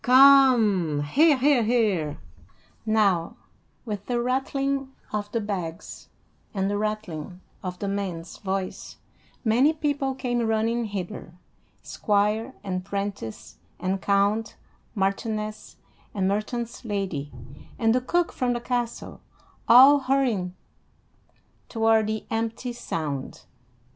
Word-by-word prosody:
Come, 245 - +6
hear, 290 - +4
hear, 270 -1 +4
hear!" 210 -10 +1 0.7
Now 200 -6 +2 0.5
with 205 -3 -5
the 245 -1 0
rattling 270 +2 -1 0.2
of 205 -1 -3
the 230 - 0
bags, 185 -6 -5 0.5
and 195 0 0
the 205 - 0
rattling 190 -6 -4 0.2
of 180 -3 -5
the 200 - -4
man's 190 -4 -4
voice, 190 -2 -4 0.5
many 250 +8 +4
people 285 -3 -1
came 245 -2 -1
running 225 +2 0
hither: 185 -4 -6 0.5
squire 210 +4 0
and 185 -2 -3
'prentice 195 - -5 0.2
and 185 +2 -1
count, 205 +2 +1 0.4
marchioness 215 +2 -2 0.4
and 190 -2 +1
merchant's 230 +5 -3
lady, 195 -10 -3 0.5
and 225 -1 +3
the 250 - +2
cook 345 +7 0
from 250 -1 0
the 240 - -2
castle, 240 -1 -3 0.5
all 265 +5 +8
hurrying 250 -10 0 1.1
toward 225 -1 +3
the 220 0 -3
empty 230 +2 -2
sound. 150 - -5
215 Hz, 110 wpm, -25 LUFS, 195-245 Hz, 1.1 s, all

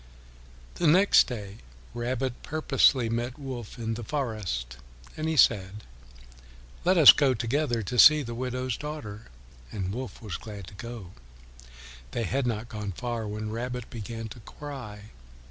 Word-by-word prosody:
The 170 - +4
next 185 +6 +6
day 105 -5 -6 0.4
Rabbit 125 +1 -3
purposely 145 -5 +3
met 120 +3 -2
Wolf 130 -6 -7
in 115 -1 -3
the 120 +1 -5
forest, 105 - -3 0.4
and 155 +1 -2
he 160 - -1
said, 105 -4 +3 1.0
"Let 185 +1 +3
us 155 -5 +11
go 135 -3 +2
together 120 0 0
to 120 +5 -2
see 155 -1 +8
the 120 -2 -6
widow's 125 0 -3
daughter." 130 -9 -7 0.4
And 95 -2 -3
Wolf 130 +3 -6
was 105 -6 -5
glad 105 -4 -9
to - - -16
go. 115 -3 -8 1.0
They 120 - -1
had 130 +5 -1
not 115 0 -2
gone 105 -4 -5
far 120 +1 -4
when 105 +1 -4
Rabbit 125 +1 -5
began 115 0 -6
to 120 - -10
cry. 110 -5 -9
120 Hz, 145 wpm, -27 LUFS, 105-130 Hz, 1.0 s, us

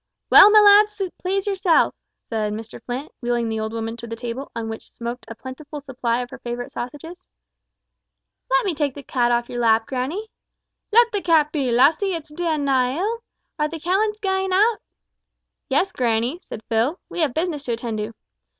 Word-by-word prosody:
"Well, 405 - +10
my 425 0 +7
lads, 420 +1 +6 0.2
please 385 +1 -1
yourselves," 385 -4 +2 0.3
said 215 -2 -2
Mr 220 +1 -8
Flint, 255 +4 -5
wheeling 240 -1 0
the 220 0 -2
old 220 0 -3
woman 225 0 -4
to 235 0 -8
the 230 - -5
table, 245 +4 -5
on 230 -1 -3
which 225 0 -7
smoked 235 +1 -6
a 230 - -7
plentiful 280 +5 -8
supply 250 -3 -2
of 245 - -11
her - - -9
favourite 240 0 -5
sausages. 295 +7 -7 1.3
"Let - - +3
me 380 - 0
take 290 -3 -1
the 285 - -9
cat 240 -3 +1
off 240 0 +1
your 240 - -5
lap, 225 -1 +3
grannie," 290 - -4 0.6
said - - -56
May. - - +3
"Let 475 -1 +6
the 410 - -1
cat 315 -4 +3
be, 280 -5 -1
lassie; 310 - +3
it's 320 -2 -7
daein' 315 -3 -1
nae 260 0 +2
ill. 435 +6 -1 0.4
Are 300 - +2
the 325 +1 -7
callants 410 +6 0
gaein' 380 -1 -1
oot?" 420 +4 +3 0.9
"Yes, 295 +8 +1
grannie," 240 +5 0
said 220 - -9
Phil, 235 +10 +1
"we - - -7
have 300 -7 +1
business 320 -3 -1
to 240 - -1
attend 230 -2 -4
to." 215 +2 -5
275 Hz, 195 wpm, -22 LUFS, 235-365 Hz, 1.3 s, Well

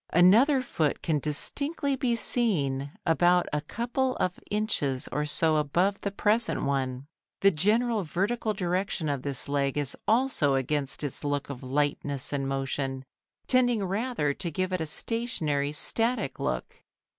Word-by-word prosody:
Another 235 - +5
foot 155 - -1
can 155 -3 +1
distinctly 280 - 0
be 250 -2 0
seen 145 - 0
about 175 +2 +4
a 150 - 0
couple 245 - -2
of 180 -1 -1
inches 175 - 0
or 150 0 -1
so 155 +1 +3
above 175 +7 +1
the 200 - -1
present 215 +3 +1
one. 135 -1 -1 0.4
The 195 - +6
general 215 +7 +2
vertical 210 +6 -1
direction 180 -3 -1
of 140 -2 -1
this 140 -2 -2
leg 140 -1 0
is 145 -3 -1
also 220 - +2
against 135 +1 -2
its 145 0 -4
look 145 -1 -2
of 125 - -8
lightness 140 0 -1
and 135 -1 -1
motion, 135 0 -2 0.4
tending 245 -5 +2
rather 195 - -1
to 170 - -4
give 185 +4 -2
it 185 - -1
a 160 - -2
stationary, 155 - -1
static 225 - 0
look. - - -3
165 Hz, 145 wpm, -28 LUFS, 140-220 Hz, 0.4 s, The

